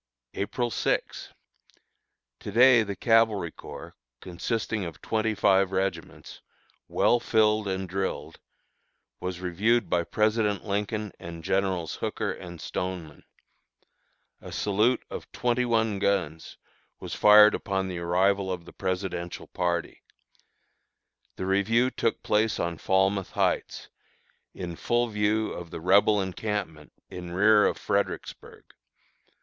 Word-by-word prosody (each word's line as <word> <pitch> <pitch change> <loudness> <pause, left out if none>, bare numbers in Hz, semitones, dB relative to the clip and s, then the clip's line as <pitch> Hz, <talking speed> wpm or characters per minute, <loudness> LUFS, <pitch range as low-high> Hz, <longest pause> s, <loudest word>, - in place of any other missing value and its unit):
April 120 +4 -2
6. - - -2 1.1
To - - -7
day 120 +2 +6
the 100 -2 -3
Cavalry 110 -7 +2
Corps, - - -10 0.3
consisting 105 - -3
of 85 -3 -7
twenty 110 0 -1
five 95 -1 +3
regiments, 95 -3 -4 0.5
well 120 - +2
filled 110 -2 +2
and 95 0 -2
drilled, 95 +1 -4 0.8
was 90 -1 -5
reviewed 105 +7 +1
by 85 -1 +2
President 105 +1 0
Lincoln 105 +1 -2
and 85 -1 -9
Generals 95 -3 -1
Hooker - - -2
and 85 -1 -9
Stoneman. 85 -2 -5 1.2
A - - -10
salute 105 +5 +1
of - - -8
twenty 125 0 0
one 110 -3 +1
guns 85 -6 -1 0.4
was - - -7
fired 105 0 +7
upon 95 -1 -2
the 90 -2 -5
arrival 95 +3 +1
of 90 -2 -5
the - - -13
Presidential 90 -2 -4
party. 85 -2 -2 1.3
The 95 - -4
review 110 +6 +2
took 115 - -1
place 110 +1 +1
on 85 -1 -2
Falmouth 95 0 +1
Heights, - - -1 0.7
in 85 -2 -6
full 120 0 0
view 105 +1 0
of 85 -1 -8
the - - -7
Rebel 100 +4 +4
encampment 95 -5 -4 0.2
in 90 -1 -7
rear 105 +3 +5
of - - -2
Fredericksburg. - - -3
100 Hz, 120 wpm, -27 LUFS, 90-110 Hz, 1.3 s, fired